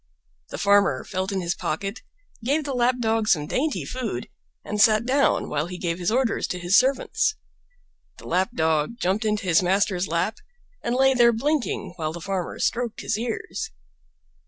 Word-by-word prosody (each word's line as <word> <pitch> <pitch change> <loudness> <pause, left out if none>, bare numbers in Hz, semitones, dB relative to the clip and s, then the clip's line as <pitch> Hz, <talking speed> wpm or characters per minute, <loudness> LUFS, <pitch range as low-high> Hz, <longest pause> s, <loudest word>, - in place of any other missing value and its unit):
The - - -6
Farmer 200 -10 +3
felt 190 +1 -3
in 195 -1 -1
his 170 -1 -1
pocket, 195 +9 -3 0.4
gave 285 +6 +1
the 280 -1 -3
Lap 245 0 +2
dog 225 -2 +1
some 150 -8 +3
dainty 285 - -1
food, 230 - -4 0.4
and 210 0 -1
sat 215 0 +5
down 275 +3 +2
while 150 +2 -1
he 180 0 -7
gave 170 -1 -2
his 175 - 0
orders 245 +1 +1
to 180 - -3
his 175 +2 +2
servants. 265 - +2 0.8
The - - -13
Lap 185 +5 +1
dog 160 +4 +1
jumped 200 +2 0
into 215 0 0
his 170 -1 +4
master's 190 0 +1
lap, 170 +7 -1 0.5
and 235 - 0
lay 265 +1 +4
there 240 -2 +5
blinking 275 - -1
while 155 -2 -2
the 170 - -6
Farmer 185 0 -3
stroked 240 -1 -1
his - - -1
ears. 240 - -4
210 Hz, 175 wpm, -24 LUFS, 180-245 Hz, 0.8 s, sat